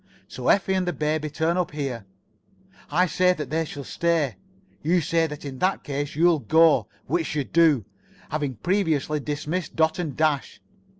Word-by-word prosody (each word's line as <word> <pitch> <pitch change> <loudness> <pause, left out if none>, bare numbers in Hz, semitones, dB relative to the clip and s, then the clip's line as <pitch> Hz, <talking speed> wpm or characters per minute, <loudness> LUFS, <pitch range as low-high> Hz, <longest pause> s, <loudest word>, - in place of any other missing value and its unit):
So - - -6
Effie 190 -1 +3
and 185 -1 0
the 175 - 0
baby 155 0 -1
turn 160 +4 0
up 180 -1 0
here. 135 -8 -4 0.8
I 175 +5 +3
say 180 +2 +3
that 155 -4 -6
they 160 +1 0
shall 145 -2 -7
stay. 160 - 0 0.4
You 175 +4 +2
say 165 0 +1
that 150 -1 -8
in 135 -2 -7
that 185 +1 +1
case 145 +1 -4
you'll 165 0 +4
go, 160 -7 +4 0.2
which 165 -3 -1
you 145 - +1
do, 155 - +3 0.5
having 145 -3 -2
previously 155 - 0
dismissed 150 +4 -3
Dot 160 +1 +2
and 155 -7 -3
Dash. 155 -5 0
155 Hz, 170 wpm, -24 LUFS, 145-170 Hz, 0.8 s, you'll